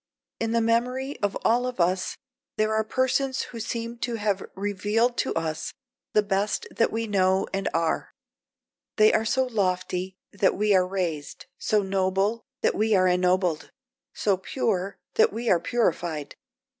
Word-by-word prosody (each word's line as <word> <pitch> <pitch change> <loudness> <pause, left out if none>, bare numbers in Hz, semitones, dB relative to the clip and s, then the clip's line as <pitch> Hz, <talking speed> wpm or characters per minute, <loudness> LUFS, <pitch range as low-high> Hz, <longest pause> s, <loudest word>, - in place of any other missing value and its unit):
In 225 - -1
the 230 0 +2
memory 250 +4 0
of 205 -1 0
all 245 +2 +3
of 250 -5 -5
us 180 +1 +1 0.4
there 215 0 +2
are 220 0 +2
persons 260 +3 0
who 235 - -8
seem 230 +1 -4
to 240 -1 -2
have 205 -3 0
revealed 205 +5 0
to - - 0
us 160 -1 -3 0.4
the 210 - +4
best 200 0 0
that 230 - +1
we 225 +1 -1
know 190 -2 +2
and 195 0 0
are; 165 -1 0 0.9
they 215 0 +5
are 220 - +2
so 260 +4 +2
lofty 185 -4 -1 0.2
that 200 -1 +2
we 210 0 +3
are 185 -1 +4
raised, 175 -6 -3
so 210 -1 +2
noble 195 +3 0 0.2
that - - +2
we 215 +1 +2
are 185 -1 +4
ennobled; 180 -2 +1 0.4
so 200 -3 +1
pure 195 -2 -2 0.2
that - - +5
we 230 +2 -1
are 175 - +5
purified. 170 - -1
205 Hz, 155 wpm, -26 LUFS, 185-230 Hz, 0.9 s, they